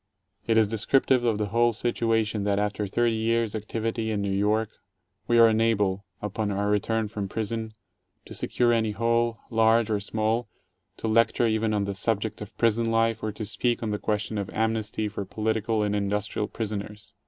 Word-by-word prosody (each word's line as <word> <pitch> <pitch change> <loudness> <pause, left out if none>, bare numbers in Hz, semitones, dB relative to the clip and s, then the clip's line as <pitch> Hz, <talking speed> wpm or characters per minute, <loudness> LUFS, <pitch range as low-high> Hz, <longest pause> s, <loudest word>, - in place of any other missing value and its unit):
It 115 -1 +3
is 110 -2 +5
descriptive 120 +4 +2
of 115 -3 +1
the 105 -1 -2
whole 120 +2 +3
situa 115 -1 +1
tion 105 0 -3
that 100 0 +1
after 105 0 -1
thirty 120 +4 +1
years' 115 0 0
activity 110 +1 -3
in 105 -2 -1
New 100 - -1
York, 105 +3 +1 0.6
we 120 - +3
are 115 - +8
unable 105 -3 +1
— - - -42
upon 105 +1 -2
our 100 +1 -1
return 110 +2 0
from 105 -2 -5
prison 110 +1 -3 0.3
— - - -49
to - - -10
secure 120 -1 +1
any 110 -2 +1
hall, 115 +1 +1
large 115 0 +3
or 105 - +1
small, 110 +3 -1 0.5
to - - -4
lecture 115 +2 +3
even 110 -1 +1
on 105 -1 +1
the 100 0 -2
subject 110 +2 -2
of 105 - -9
prison 115 0 +2
life 115 0 +1
or 110 - -2
to 105 +1 -6
speak 120 +3 -1
on 110 - -1
the 105 - -2
question 105 0 -2
of 100 -1 -4
amnesty 110 -1 -1
for 100 -1 -4
poltical 110 +1 -1
and 105 0 0
industrial 105 +1 -1
prisoners. 105 -2 -6
110 Hz, 190 wpm, -26 LUFS, 105-115 Hz, 0.6 s, are